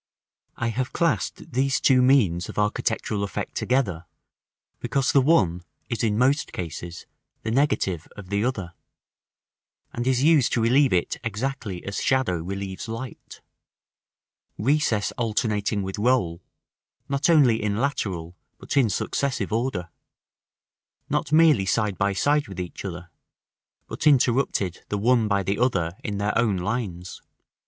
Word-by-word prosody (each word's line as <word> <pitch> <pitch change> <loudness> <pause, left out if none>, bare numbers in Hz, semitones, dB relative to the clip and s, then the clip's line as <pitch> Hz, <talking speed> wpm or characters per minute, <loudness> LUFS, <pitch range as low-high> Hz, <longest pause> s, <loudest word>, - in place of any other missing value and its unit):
§ - - -69 0.5
I. 120 - -2
I - - +1
have 125 +3 -3
classed 155 - -1
these 135 +2 +1
two 130 -2 +4
means 110 -11 +3
of - - -9
architectural 105 0 -1
effect 100 - -4
together, 95 -11 -1 0.7
because 135 -2 0
the 140 - +5
one 95 - +3 0.3
is 115 -2 -2
in 105 -2 +1
most 135 +5 +2
cases 85 0 -6 0.4
the 110 - -2
negative 105 - 0
of 95 -3 -10
the 100 +1 +1
other, 100 -9 -2 1.2
and 120 +1 -3
is 130 0 +2
used 155 -5 +4
to 120 - +2
relieve 130 +4 +4
it 90 -1 0
exactly 115 -4 -4
as 100 - -3
shadow 130 -9 +1
relieves 95 +3 -5
light; 115 +2 -8 1.2
recess 120 -4 +1
alternating 105 -2 0
with 95 +2 -5
roll, 105 -8 +1 0.7
not 140 +4 0
only 135 -9 +5
in 105 -1 -1
lateral, 95 - -2 0.2
but - - -5
in 130 -5 +4
successive 110 +2 -1
order; 110 -8 -2 1.2
not - - -1
merely 155 -11 +5
side 105 0 0
by 100 +1 +2
side 145 +10 +1
with 95 -3 -8
each 90 -1 -6
other, 90 -2 -7 0.7
but - - -2
interrupted 120 - +2
the 105 - -1
one 115 +1 +3
by 100 -2 +1
the 100 +3 -1
other 95 -10 +1
in 100 -1 -3
their 105 +1 -1
own 110 -5 +2
lines. 90 -3 -4
110 Hz, 145 wpm, -24 LUFS, 95-130 Hz, 1.2 s, the